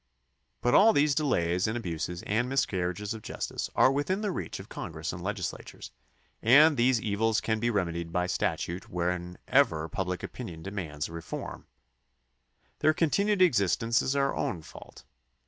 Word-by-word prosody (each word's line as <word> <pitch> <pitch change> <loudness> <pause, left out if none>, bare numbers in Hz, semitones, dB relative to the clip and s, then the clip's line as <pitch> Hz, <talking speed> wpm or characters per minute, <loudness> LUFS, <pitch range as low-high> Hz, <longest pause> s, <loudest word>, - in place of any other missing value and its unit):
But 120 - +2
all 220 +2 +7
these 145 0 +3
delays 90 - +1
and 110 +2 -1
abuses 85 -3 -4
and 120 +4 0
miscarriages 100 -5 -1
of 110 - -8
justice - - -4
are 130 - +5
within 145 +9 -1
the 210 -2 -1
reach - - -5
of - - -10
Congress - - -5
and - - -7
legislatures, - - -5 0.5
and 145 +7 +7
these 125 -1 +3
evils 110 +1 +1
can 110 -1 -1
be 120 +2 +1
remedied 85 -6 -2
by 90 0 0
statute 90 0 -2
whenever 90 -2 0
public 90 +2 -3
opinion 80 -2 -7
demands 85 -7 -4
a - - -13
reform. 85 0 -7 1.1
Their 155 0 +3
continued 200 +5 +2
existence 115 - +2
is 135 - -1
our 140 0 +1
own 85 -5 -2
fault. - - -13
105 Hz, 150 wpm, -29 LUFS, 90-135 Hz, 1.1 s, all